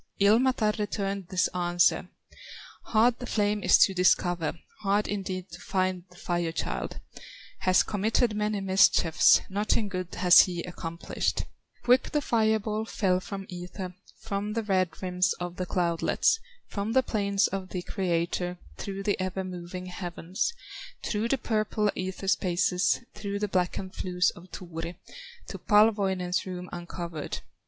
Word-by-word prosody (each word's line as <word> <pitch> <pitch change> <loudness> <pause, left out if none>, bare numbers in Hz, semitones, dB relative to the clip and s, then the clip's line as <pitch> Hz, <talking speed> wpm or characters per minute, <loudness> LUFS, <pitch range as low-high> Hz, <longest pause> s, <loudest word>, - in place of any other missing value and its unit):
Ilmatar 220 +2 +4
returned 200 -2 -2
this 185 0 +1
answer: 175 -1 +2 0.8
"Hard 230 +2 +3
the 245 - -6
flame 210 -2 +1
is - - +6
to 195 - +5
discover, 175 -2 +2 0.3
Hard 205 0 +1
indeed 190 -3 -4
to 170 - -9
find 185 -2 -1
the 180 - -19
Fire 175 -1 -2
child; 165 - -4 0.6
Has 185 0 +4
committed 215 +2 +1
many 210 -1 -1
mischiefs, 190 -3 +5
Nothing 205 +2 0
good 185 -2 -5
has 180 -1 +7
he 175 -2 +3
accomplished; 170 -1 -3 0.4
Quick 250 +1 +3
the 300 - +3
fire 220 -4 +2
ball 215 0 -3
fell 185 -5 +1
from 195 +1 -7
ether, 180 +1 -7 0.2
From 205 +1 -3
the 225 0 -1
red 190 -3 +2
rims 180 0 +1
of 175 0 -6
the 185 - -3
cloudlets, 175 - +1 0.3
From 205 +2 -3
the 260 +1 +4
plains 200 -4 +1
of 190 -1 -4
the 180 -1 -4
Creator, 180 -1 -1 0.2
Through 195 0 -5
the 205 -1 0
ever 185 +1 -2
moving 180 0 -7
heavens, 180 - -3 0.5
Through 215 +1 -1
the 270 - +1
purple 215 -3 0
ether 190 +1 -5
spaces, 180 -1 +2
Through 200 -1 -4
the 210 +1 -1
blackened 185 0 -1
flues 180 0 +1
of 175 - -14
Turi, 170 -1 -6 0.5
To - - -6
Palwoinen's 195 -4 +3
rooms 180 -1 -6
uncovered. 170 -2 -5
190 Hz, 145 wpm, -28 LUFS, 180-210 Hz, 0.8 s, has